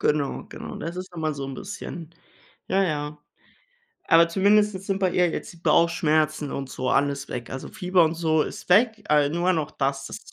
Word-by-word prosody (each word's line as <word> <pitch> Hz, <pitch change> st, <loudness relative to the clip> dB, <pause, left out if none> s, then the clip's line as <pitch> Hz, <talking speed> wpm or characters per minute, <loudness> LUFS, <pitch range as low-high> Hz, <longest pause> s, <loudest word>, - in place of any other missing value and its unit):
Genau, 150 Hz, -2 st, 0 dB
genau. -, -, -8 dB
Das 170 Hz, +2 st, -5 dB
ist 185 Hz, 0 st, -7 dB
dann 170 Hz, -, -7 dB
mal 155 Hz, -1 st, -1 dB
so 140 Hz, -1 st, -5 dB
'n 135 Hz, -, -6 dB
bisschen, 170 Hz, -1 st, -7 dB, 0.6 s
ja, 195 Hz, +1 st, +2 dB
ja. 150 Hz, -3 st, -2 dB, 0.9 s
Aber 170 Hz, 0 st, +6 dB
zumindest 205 Hz, +3 st, +3 dB
jetzt 190 Hz, +1 st, -7 dB
sind 195 Hz, -1 st, 0 dB
bei 190 Hz, -2 st, +1 dB
ihr 180 Hz, -1 st, +3 dB
jetzt -, -, -5 dB
die -, -, -16 dB
Bauchschmerzen 155 Hz, -2 st, +2 dB
und 135 Hz, -1 st, -4 dB
so 130 Hz, -1 st, -3 dB
alles 140 Hz, 0 st, +1 dB
weg. 120 Hz, -1 st, -6 dB
Also 130 Hz, -, -6 dB
Fieber 180 Hz, 0 st, +2 dB
und 160 Hz, +1 st, 0 dB
so 160 Hz, -2 st, +2 dB
ist -, -, -8 dB
weg, 215 Hz, +3 st, +4 dB
a 150 Hz, -1 st, +4 dB
nur 175 Hz, +4 st, +1 dB
noch 155 Hz, -4 st, -1 dB
das. 140 Hz, 0 st, -1 dB
Das -, -, -7 dB
160 Hz, 205 wpm, -25 LUFS, 145-185 Hz, 0.9 s, Aber